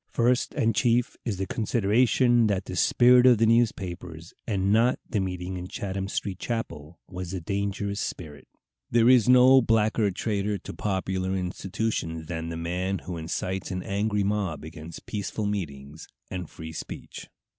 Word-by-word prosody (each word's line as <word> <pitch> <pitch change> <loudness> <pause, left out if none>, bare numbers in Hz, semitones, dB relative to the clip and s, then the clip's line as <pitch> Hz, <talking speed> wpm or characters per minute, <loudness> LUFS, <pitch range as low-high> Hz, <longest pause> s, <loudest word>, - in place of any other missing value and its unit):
First 120 +1 +1
and 115 0 +2
chief 120 +2 +1
is 110 -6 -2
the 95 - -2
consideration 120 +3 +2
that 100 -3 -1
the 90 - -6
spirit 125 +6 +5
of 125 -2 +7
the 115 - +3
newspapers, 90 -8 -1
and 100 -2 +1
not 120 +3 +4
of - - -35
the 105 - +1
meeting 90 -1 -3
in 90 0 -6
Chatham 95 0 -4
Street 100 -1 -3
chapel, 85 -9 -5
was 90 -1 -6
the 95 +1 -3
dangerous 100 +2 -2
spirit. 75 -5 -6 0.4
There 115 0 +4
is 125 -2 +6
no 130 +1 +7
blacker 110 -2 +2
traitor 100 +1 -1
to 95 - -9
popular 95 -1 -2
institutions 90 -2 -3
than 80 0 -4
the 85 - -5
man 90 +3 -2
who 90 - -5
incites 90 +3 -3
an 90 -1 -4
angry 105 +1 0
mob 95 -8 -1
against 80 +1 -10
peaceful 105 +1 -3
meetings 75 -7 -5 0.2
and 90 -3 -5
free 80 0 -9
speech. - - -8
100 Hz, 160 wpm, -26 LUFS, 90-110 Hz, 0.4 s, of